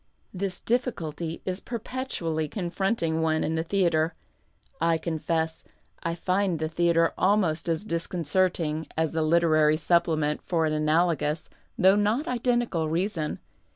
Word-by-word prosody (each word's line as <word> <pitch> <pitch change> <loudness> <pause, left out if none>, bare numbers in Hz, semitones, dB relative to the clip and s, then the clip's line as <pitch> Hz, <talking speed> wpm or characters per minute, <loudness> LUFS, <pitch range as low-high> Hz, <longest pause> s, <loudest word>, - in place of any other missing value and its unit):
Tliis 185 0 -4
difficulty 170 - -2
is 185 0 -1
perpetually 225 -11 -3
confronting 175 -1 -1
one 160 -1 +1
in 160 - -1
the 160 - 0
theatre. 170 -3 +1 0.7
I 165 -1 +3
confess, 160 0 -2 0.4
I 165 0 -2
find 185 0 0
the 155 0 -2
theatre 165 +1 +2
almost 185 -5 +2
as 165 +5 -1
disconcerting 170 -2 -1
as 160 -1 +1
the 160 - -1
Literary 155 -1 +4
Supplement 155 -3 +1
for 165 -2 0
an 155 - 0
analogous, 155 0 +1 0.3
though 190 -2 +6
not 215 +9 +1
identical, 240 -9 0
reason. 165 -1 -1
170 Hz, 125 wpm, -26 LUFS, 160-190 Hz, 0.7 s, though